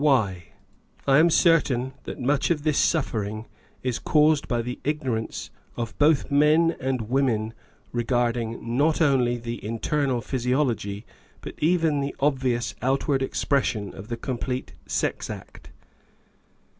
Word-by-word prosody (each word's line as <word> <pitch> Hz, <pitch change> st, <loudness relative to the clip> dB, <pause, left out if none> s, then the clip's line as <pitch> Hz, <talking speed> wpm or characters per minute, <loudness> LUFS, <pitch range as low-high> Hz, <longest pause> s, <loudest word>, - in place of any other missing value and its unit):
Why? 105 Hz, -, +2 dB, 0.6 s
I 135 Hz, +1 st, +5 dB
am 165 Hz, +2 st, +6 dB
certain 140 Hz, -7 st, +3 dB
that -, -, -6 dB
much 140 Hz, +3 st, +1 dB
of 155 Hz, -4 st, 0 dB
this 150 Hz, -2 st, +2 dB
suffering 110 Hz, -8 st, 0 dB, 0.4 s
is 125 Hz, -2 st, -1 dB
caused 150 Hz, -1 st, +3 dB
by 120 Hz, -2 st, 0 dB
the 125 Hz, +1 st, -5 dB
ignorance 130 Hz, -7 st, -2 dB, 0.3 s
of 115 Hz, -2 st, -4 dB
both 150 Hz, -1 st, +3 dB
men 155 Hz, +3 st, +4 dB
and 130 Hz, -2 st, -1 dB
women 115 Hz, -2 st, 0 dB, 0.4 s
regarding 120 Hz, -1 st, -1 dB
not 155 Hz, +4 st, +2 dB
only 130 Hz, -6 st, +3 dB
the 120 Hz, 0 st, -5 dB
inner 125 Hz, +4 st, -1 dB
physiology, 120 Hz, -5 st, -1 dB, 0.4 s
but -, -, -7 dB
even 160 Hz, -2 st, +2 dB
the 140 Hz, 0 st, -3 dB
obvious 130 Hz, -4 st, 0 dB
outward 135 Hz, +2 st, +1 dB
expression, 130 Hz, -6 st, 0 dB
of 95 Hz, -, -10 dB
the 120 Hz, 0 st, -4 dB
complete 125 Hz, -, -4 dB
sex -, -, -1 dB
act. -, -, -9 dB
130 Hz, 130 wpm, -25 LUFS, 115-145 Hz, 0.6 s, am